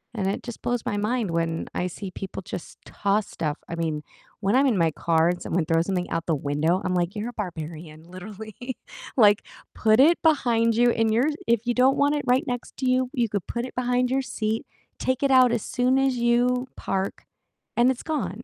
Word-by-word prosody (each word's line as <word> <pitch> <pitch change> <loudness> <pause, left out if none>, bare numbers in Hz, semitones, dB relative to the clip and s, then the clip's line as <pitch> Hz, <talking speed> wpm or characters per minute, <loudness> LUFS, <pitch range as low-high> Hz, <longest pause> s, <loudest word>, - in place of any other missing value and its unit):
And 195 -4 -1
it 195 - -2
just 240 -2 -8
blows 245 -1 -1
my - - -1
mind 215 -1 -1
when 165 -1 -1
I 180 - -1
see 185 +2 -7
people 190 +1 -7
just 175 - -8
toss 200 +1 0
stuff, 150 -1 -3
I - - -6
mean, 160 -3 -2 0.4
when 200 +3 +2
I'm 275 +2 +5
in 230 -7 +2
my 165 -2 +3
car 165 +1 +2
and 175 0 -2
someone 170 -1 -1
throws 165 +1 +1
something 180 -2 -1
out 165 0 -1
the 160 - +2
window, 150 +6 0
I'm 185 - -1
like, 175 +2 0
"You're 215 +3 -3
a - - -10
barbarian, 160 -5 -6
literally, 210 +7 -8 0.4
like, 210 -3 +5 0.3
put 220 +2 +3
it 330 +5 +5
behind 235 -8 +3
you 240 +1 +4
in 225 -1 +1
your 240 +7 +3 0.2
if 235 0 +2
you 240 - +1
don't 260 +2 +4
want 285 +1 +3
it 290 - -3
right 255 +5 +3
next 245 -3 -5
to 260 -1 0
you, 255 0 +1
you 240 -4 0
could 200 -4 -3
put 235 +1 -3
it 255 - -9
behind 250 0 +1
your 270 +1 +2
seat, 220 -3 -2 0.3
take 260 +1 -1
it 275 - +3
out 255 -2 +6
as 235 - -1
soon 250 +1 +1
as 270 -2 +2
you 245 +2 +2
park, 195 0 -3 0.5
and 240 +2 +5
it's 255 - -6
gone." 235 - -3
220 Hz, 220 wpm, -25 LUFS, 180-250 Hz, 0.5 s, out